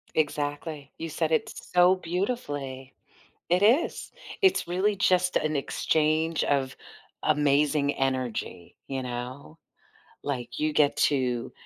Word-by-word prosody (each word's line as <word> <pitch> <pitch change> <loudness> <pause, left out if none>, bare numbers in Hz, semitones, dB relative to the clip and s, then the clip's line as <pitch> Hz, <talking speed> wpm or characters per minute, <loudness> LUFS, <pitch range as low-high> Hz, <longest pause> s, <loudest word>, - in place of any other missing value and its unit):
Exactly. 145 -1 -2
You 165 0 -5
said 160 +1 -1
it 160 - +1 0.2
so 180 +1 +6
beautifully. 155 - -4 0.6
It 180 +3 +2
is. 245 +10 +2 0.3
It's 380 - +3
really 190 +4 +1
just 180 -1 +2
an 155 0 +1
exchange 155 +3 +1
of 135 -2 0 0.5
amazing 145 -1 +2
energy, 125 -9 -3
you 135 -1 -3
know? 125 +5 -6 0.6
Like, 130 -4 -4
you 155 0 0
get 145 -1 +3
to 125 -4 -1
150 Hz, 115 wpm, -27 LUFS, 135-165 Hz, 0.6 s, so